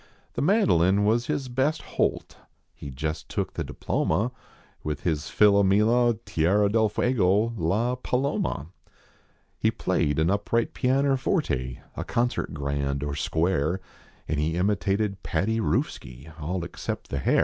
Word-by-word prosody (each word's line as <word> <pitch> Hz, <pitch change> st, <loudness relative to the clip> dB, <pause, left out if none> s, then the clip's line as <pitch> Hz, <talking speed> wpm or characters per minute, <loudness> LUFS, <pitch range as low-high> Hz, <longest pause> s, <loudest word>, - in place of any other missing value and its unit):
The -, -, -2 dB
mandolin 105 Hz, -, +3 dB
was 120 Hz, +3 st, +2 dB
his 135 Hz, -, -1 dB
best 135 Hz, +6 st, 0 dB
holt -, -, -1 dB, 0.4 s
He 70 Hz, -, -9 dB
jest 75 Hz, +4 st, -4 dB
took -, -, -2 dB
the -, -, -3 dB
diploma 105 Hz, +10 st, -1 dB, 0.5 s
With 75 Hz, -2 st, -3 dB
his 80 Hz, -3 st, -1 dB
Philomela, 105 Hz, +4 st, +4 dB
Tierra 100 Hz, +6 st, +2 dB
Del 110 Hz, 0 st, +3 dB
Fuego, 105 Hz, -1 st, +2 dB
L,a 110 Hz, +7 st, 0 dB
Paloma. 130 Hz, -, -1 dB, 0.9 s
He -, -, +3 dB
played 75 Hz, -1 st, 0 dB
an 80 Hz, +3 st, +2 dB
upright 105 Hz, +3 st, 0 dB
pianner 135 Hz, +1 st, +2 dB
forte, 65 Hz, -, -1 dB
A -, -, -3 dB
concert 120 Hz, +1 st, -1 dB
grand, 70 Hz, -1 st, -2 dB
or 75 Hz, -1 st, -2 dB
square, 80 Hz, +2 st, 0 dB, 0.5 s
And 75 Hz, -, -1 dB
he 80 Hz, +2 st, 0 dB
imitated 100 Hz, +1 st, 0 dB
Paddy 105 Hz, +8 st, 0 dB
Roofski, 80 Hz, -, -2 dB
all 90 Hz, +3 st, -2 dB
accept -, -, -5 dB
the 70 Hz, -, -2 dB
hair. -, -, +2 dB
100 Hz, 135 wpm, -26 LUFS, 80-115 Hz, 0.9 s, Philomela